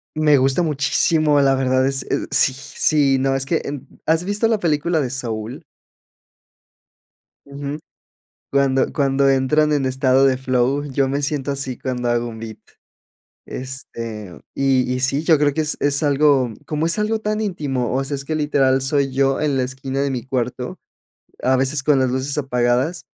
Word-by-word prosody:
Me 155 -1 +4
gusta 135 +4 +2
muchísimo, 150 0 +2
la 135 -1 +3
verdad 130 0 +1
es 135 -1 -1
eh - - -2
sí 140 -1 +4
sí 135 +1 +1
no, 135 +1 +1
es 135 0 -1
que 160 +4 0
en 140 -1 -6 0.2
¿has 160 +2 +1
visto 205 +3 0
la 220 - +1
película 160 -1 0
de 130 - -1
Saúl? 115 -3 -5 1.8
Ujú, 140 +1 -6 0.7
cuando 135 -1 +2
cuando 140 -1 +2
entran 135 +3 +2
en 140 -2 +1
estado 130 0 +3
de 130 -1 +3
flow, 130 +2 0
yo 135 +1 +1
me 140 +2 -1
siento 140 -1 -2
así, 135 -2 -3
cuando 125 -2 -3
hago 120 0 0
un 110 -1 -8
beat, 110 -1 -8 0.9
este, 115 -7 -7
y 130 -2 +1
y 125 - -2
sí, 135 +3 0
yo 160 -2 +4
creo 145 -1 +2
que 155 - 0
es 155 - -2
es 145 +1 +1
algo 140 -4 +3
como 155 +1 -2
es 170 +6 +1
algo 220 +1 0
tan 215 0 -2
íntimo, 145 - -2
o 135 - 0
sea, 140 +1 -3
es 140 0 -7
que 155 - -2
literal 135 -3 +2
soy 135 0 +1
yo 135 0 +1
en 150 -3 0
la 130 - +1
esquina 130 +1 -4
de 140 -1 0
mi 125 -1 -4
cuarto, 125 -2 -3 0.6
a 130 +1 +3
veces 135 +2 0
con 140 -1 +3
las 130 - +1
luces 130 +3 -2
apagadas 130 +4 0
135 Hz, 180 wpm, -20 LUFS, 130-150 Hz, 1.8 s, Me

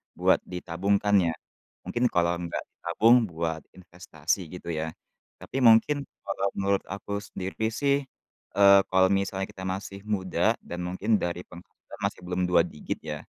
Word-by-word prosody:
buat - - +3
ditabungkan, 100 +3 0
ya. 80 - -1 0.5
Mungkin 120 +1 +1
kalau 85 0 +2
nggak 85 -1 -4 0.2
ditabung 110 +8 +4 0.2
buat 80 -1 -2
investasi, 85 -1 -3
gitu 90 - -9
ya, 80 +1 -3 0.5
tapi 135 - -3
mungkin 125 +5 +5 0.2
kalau 100 0 0
menurut 100 0 +1
aku 100 +1 -4
sendiri 105 +4 -3
sih, 140 +4 +1 0.6
eee, 100 0 +8
kalau 95 0 +5
misalnya 95 0 0
kita 95 - -10
masih 95 +1 -4
muda 95 -4 +1
dan 85 - -7
mungkin 95 +5 0
dari 85 +1 -3
penghasilan 90 0 -14
masih - - -2
belum 90 0 -1
2 90 0 +4
digit - - -6
ya, 75 -1 -5
95 Hz, 150 wpm, -27 LUFS, 85-100 Hz, 0.6 s, eee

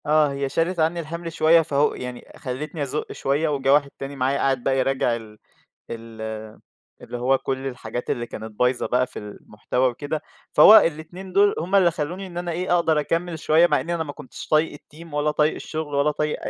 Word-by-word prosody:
آه 150 -1 +3
هي 140 0 -2
شالت 165 +5 0
عنّي 165 +2 +1
الحمل 170 +1 -5
شوية، 165 +2 +5
فهو 145 -2 +1
يعني 125 -1 -7
خلّتني 145 +4 -4
أزُقّ 140 +2 -4
شوية، 145 +4 0
وجَه 135 -2 +2
واحد 140 -1 +3
تاني 140 +1 -6
معايا 135 +1 0
قاعد 135 -3 0
بقى 135 +1 +1
يراجع 130 -2 +1
ال 110 -2 -10 0.5
ال 115 -1 -8 0.8
اللي 120 - -6
هو 130 +2 +2
كُلّ 135 0 -3
الحاجات 125 -1 -6
اللي 120 - -1
كانت 110 -1 -9
بايظة 125 0 +2
بقى 125 +1 +1
في 125 - -8
المحتوى 105 +4 -2
وكده، 145 +5 -4 0.3
فهو 205 +8 +9
الاتنين 175 +1 -1
دول 200 +1 +4
هُم 180 +5 -1
اللي 185 -3 +5
خلّوني 175 +6 -4
إن 175 -1 -9
أنا 175 0 -3
إيه 175 +1 0
أقدر 160 -3 +2
أكمل 165 +2 -2
شوية، 160 +3 +4
مع - - +2
إنّي 170 +1 -2
أنا 165 - -1
ما 145 -2 -7
كنتش 130 -6 -10
طايق 155 -1 +2
الteam 160 +1 -14
ولا 150 +1 +1
طايق 150 +1 +2
الشغل 155 -2 -5
ولا 140 +2 +3
طايق 150 0 -2
أ - - -2
150 Hz, 205 wpm, -23 LUFS, 130-165 Hz, 0.8 s, فهو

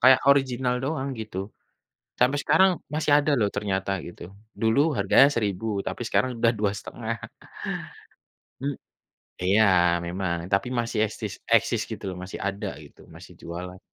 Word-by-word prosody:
kayak 130 -2 +7
original 130 -2 +3
doang, 140 -2 -2
gitu. 110 -4 -7 0.8
Sampai 130 +4 +3
sekarang 185 +5 +5 0.2
masih 155 -1 0
ada 150 +1 +2
loh 105 -2 +2
ternyata, 95 -1 -1 0.2
gitu. 85 - -12 0.4
Dulu 115 +4 +3 0.2
harganya 100 +7 +6
Rp1.000, 105 -1 -1 0.2
tapi - - -4
sekarang 130 - +2
udah 115 - +4
Rp2.500. 110 +3 -2 1.5
Hm 140 0 -1 0.7
iya, 105 +4 +5 0.4
memang, 90 -1 -2 0.2
tapi 100 +5 +2
masih 115 -1 -1
esis 105 - -6 0.2
eksis - - +3
gitu - - -6
loh, 90 - -7
masih 95 - -7
ada 100 +1 -3 0.2
gitu, - - -18
masih - - -12
jualan. 90 +2 -7
115 Hz, 140 wpm, -25 LUFS, 100-130 Hz, 1.5 s, kayak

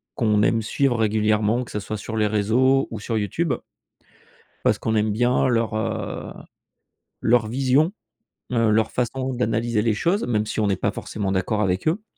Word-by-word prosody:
qu'on 105 -4 +2
aime 115 +2 +2
suivre 130 +3 +1
régulièrement, 110 +1 +1
que 120 - -11
ce 105 - -2
soit 105 +2 -5
sur 110 +2 -6
les 105 -1 +2
réseaux 120 +6 +2
ou 110 - -5
sur 115 +1 -2
YouTube. 130 - -1 1.1
Parce - - +2
qu'on 110 - -1
aime 105 0 +2
bien 120 +4 +2
leur, 115 -2 +1
heu, 110 -1 -3 0.9
leur 115 -1 +3
vision, 135 - +2 0.6
heu, 115 -2 +2
leur 110 0 +2
façon 130 +2 -2
d'analyser 115 -2 0
les 110 0 +1
choses, 175 - 0
même 110 -3 0
si 110 - -4
on 105 - +2
n'est 100 - +1
pas - - -1
forcément 100 -2 -4
d'accord 95 +3 0
avec 95 +2 0
eux. 180 +7 0
110 Hz, 175 wpm, -23 LUFS, 105-125 Hz, 1.1 s, leur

